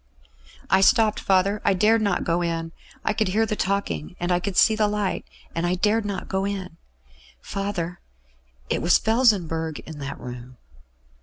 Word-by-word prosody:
"I 190 +1 +4
stopped, 215 +2 +4
father; 195 +2 +2
I 200 - +3
dared 215 +4 +3
not 200 -4 0
go 170 +1 0
in. 165 -1 -2 0.3
I 215 - +2
could 215 -1 0
hear 215 +4 +2
the 215 - -2
talking, 190 - -2
and 175 +1 -1
I 175 - +3
could 185 +1 -4
see 220 - +6
the 215 -1 +2
light; 205 -2 -2 0.3
and 165 - -2
I 180 - +1
dared 210 +3 +1
not 200 -2 -4
go 190 0 -1
in. 190 -4 -4 0.6
Father, 180 - -4 0.7
it - - -1
was 170 - +5
Felsenburgh 180 - +1
in 155 -2 -10
that 140 -1 -6
room." 125 0 -9
190 Hz, 170 wpm, -24 LUFS, 165-210 Hz, 0.7 s, see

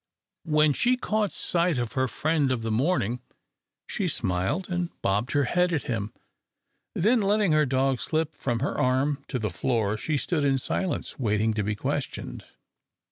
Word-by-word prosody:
When 150 -1 +4
she 250 - +2
caught 215 -4 0
sight 170 -3 0
of 120 -2 -2
her 130 0 +1
friend 150 +1 +1
of 120 -3 -1
the 115 - -1
morning, 125 - +1 0.6
she - - -2
smiled 95 - -1
and 175 -1 -1
bobbed 105 +6 0
her 145 -1 +3
head 180 +7 +2
at 160 -4 0
him, 110 -3 -3 0.8
then, 225 +6 +3
letting 205 -2 +2
her 155 -1 +4
dog 130 0 +1
slip 160 0 -1
from 120 -4 -2
her 140 - -1
arm 135 +3 +1
to 130 - -2
the 110 -4 -2
floor, 110 +1 0
she 150 +7 -1
stood 155 +1 -1
in 135 -1 +3
silence, 180 +6 -2
waiting 110 -2 +1
to 105 - -1
be 105 +1 -1
questioned. - - -4
135 Hz, 170 wpm, -26 LUFS, 115-170 Hz, 0.8 s, When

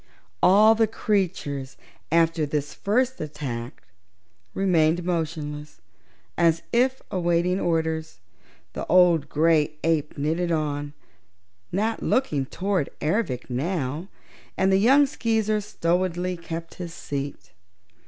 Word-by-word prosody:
All 210 +4 +7
the 225 0 +2
creatures, 170 - -2 0.3
after 165 -1 +3
this 145 0 -2
first 255 +5 0
attack, 140 -7 -6 0.7
remained 175 -3 +2
motionless, 150 - -4 0.6
as 165 0 +3
if 255 +2 +2
awaiting 175 0 +1
orders. 160 - -1 0.5
The - - -5
old 175 -4 +4
gray 155 -1 +2
ape 160 -3 0
knitted 165 +4 0
on, 145 -2 -2 0.8
not 215 +5 -1
looking 150 - 0
toward 190 -3 -1
Ervic 150 - -1
now, 145 +4 -2 0.5
and 190 0 +3
the 190 - +5
young 270 +8 +5
Skeezer 220 -5 0
stolidly 180 -1 -1
kept 165 -1 -7
his 170 -2 -6
seat. 140 0 -6
170 Hz, 105 wpm, -25 LUFS, 150-190 Hz, 0.8 s, All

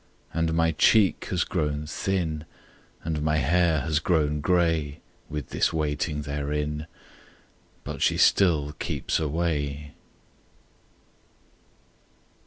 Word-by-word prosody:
And 80 0 0
my 80 0 +3
cheek 95 +3 +3
has 90 -2 0
grown 75 -3 -2
thin 80 -2 -2 0.6
And 80 -2 -2
my 75 0 +1
hair 80 +2 +2
has 75 -1 0
grown 75 -3 +1
gray 80 -4 +1 0.3
With 75 -2 -5
this - - +1
waiting 75 -1 -1
therein; 75 +1 -3 1.0
But - - -6
she - - +3
still 80 -7 +3
keeps - - -1
away! 75 -2 -2
75 Hz, 100 wpm, -26 LUFS, 75-85 Hz, 1.0 s, my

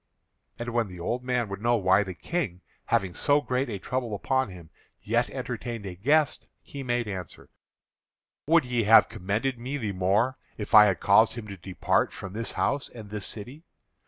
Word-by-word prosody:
And 120 0 -4
when 120 -2 0
the 90 -2 -10
old 120 +9 -2
men 125 -2 0
would 100 +1 -6
know 120 +1 +3
why 95 -2 +4
the 95 -3 -5
King, 105 - -3 0.2
having 95 -2 0
so 145 +9 +3
great 130 -2 -1
a 105 - -3
trouble 120 +1 -3
upon 130 +4 0
him, 85 -3 -12 0.3
yet - - 0
entertained 115 -4 -5
a 95 - -5
guest, 145 - +1 0.2
he 140 - -8
made 120 -3 -1
answer: 95 -5 -7 1.0
"Would 165 -2 +4
ye 120 -3 0
have 110 +2 +7
commended 110 +7 -2
me 130 +4 -4
the 110 -7 -3
more 100 +8 +1 0.2
if 105 - -6
I 105 -1 +10
had 95 -4 +1
caused 110 +3 +5
him 115 -2 -7
to 100 - -6
depart 95 +1 0
from 100 -1 -8
this 115 +1 -4
house 140 -1 -1
and 110 -4 -11
this 105 -2 -3
city? 125 +8 -6
115 Hz, 190 wpm, -27 LUFS, 100-125 Hz, 1.0 s, I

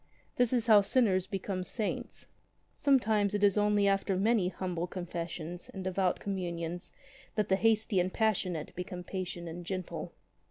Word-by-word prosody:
This 245 -2 +3
is 240 -3 +1
how 215 -3 +7
sinners 195 -4 +2
become 190 -1 -3
saints. 210 +4 -3 0.5
Sometimes 215 -7 +3
it 205 - 0
is 200 -2 +5
only 210 -1 +3
after 195 -1 +1
many 210 -1 +3
humble 180 -1 -3
confessions 175 -1 -5
and 190 - -5
devout 185 -1 0
Communions 175 -2 -4 0.4
that 210 -1 0
the 190 - +5
hasty 215 -1 +3
and 180 +1 +1
the - - -15
passionate 185 -8 0
become 180 0 -5
patient 180 -2 -5
and 170 +2 -6
gentle. 185 0 -5
190 Hz, 155 wpm, -31 LUFS, 180-210 Hz, 0.5 s, how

